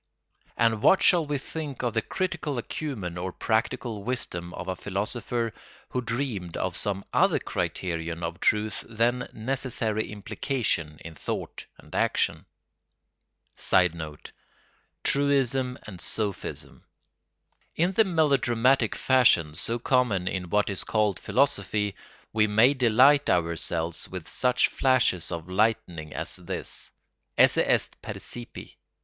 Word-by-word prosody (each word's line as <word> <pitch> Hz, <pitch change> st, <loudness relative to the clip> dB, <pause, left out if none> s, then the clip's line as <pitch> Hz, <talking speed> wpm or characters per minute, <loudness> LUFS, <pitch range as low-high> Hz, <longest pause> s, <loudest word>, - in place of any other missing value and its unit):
And 115 Hz, -2 st, +2 dB
what 190 Hz, -, +5 dB
shall 170 Hz, -4 st, +5 dB
we 145 Hz, -1 st, 0 dB
think 145 Hz, -1 st, -6 dB
of 120 Hz, -, 0 dB
the 110 Hz, -, +1 dB
critical 165 Hz, -6 st, -3 dB
acumen 110 Hz, -, -4 dB
or 95 Hz, +1 st, -3 dB
practical 110 Hz, 0 st, -1 dB
wisdom 90 Hz, -8 st, -2 dB
of -, -, -6 dB
a 95 Hz, -, -2 dB
philosopher 110 Hz, +4 st, -2 dB, 0.4 s
who 125 Hz, -, -1 dB
dreamed 115 Hz, -8 st, -3 dB
of 90 Hz, -2 st, -2 dB
some 100 Hz, -1 st, -1 dB
other -, -, +4 dB
criterion 85 Hz, -1 st, -3 dB
of 85 Hz, 0 st, -4 dB
truth 105 Hz, 0 st, +1 dB
than 120 Hz, +2 st, +1 dB
necessary 115 Hz, -3 st, -2 dB
implication 105 Hz, -, -2 dB
in 80 Hz, -, -7 dB
thought 80 Hz, -, -5 dB
and -, -, -17 dB
action? -, -, 0 dB, 1.1 s
[Sidenote: 80 Hz, -4 st, 0 dB, 0.7 s
Truism 135 Hz, -2 st, +1 dB
and 95 Hz, -6 st, -9 dB
sophism.] 105 Hz, -4 st, -2 dB, 0.9 s
In 175 Hz, +3 st, +2 dB
the 220 Hz, +4 st, +5 dB
melodramatic 135 Hz, -, +2 dB
fashion 125 Hz, -, +4 dB
so 115 Hz, +9 st, -2 dB
common 120 Hz, -7 st, +1 dB
in 90 Hz, -2 st, -2 dB
what 105 Hz, +2 st, +2 dB
is 95 Hz, -, -2 dB
called 105 Hz, -4 st, +1 dB
philosophy 105 Hz, -6 st, +1 dB, 0.4 s
we 110 Hz, -1 st, +3 dB
may 110 Hz, +6 st, +5 dB
delight 130 Hz, +3 st, +5 dB
ourselves 85 Hz, -1 st, -1 dB
with 90 Hz, -3 st, -7 dB
such 125 Hz, -1 st, +2 dB
flashes 125 Hz, -11 st, +1 dB
of 85 Hz, -1 st, -5 dB
lightning 90 Hz, -6 st, 0 dB
as -, -, -2 dB
this: -, -, -4 dB, 0.5 s
esse -, -, +6 dB
est -, -, +1 dB
percipi. -, -, -8 dB
110 Hz, 120 wpm, -27 LUFS, 90-130 Hz, 1.1 s, esse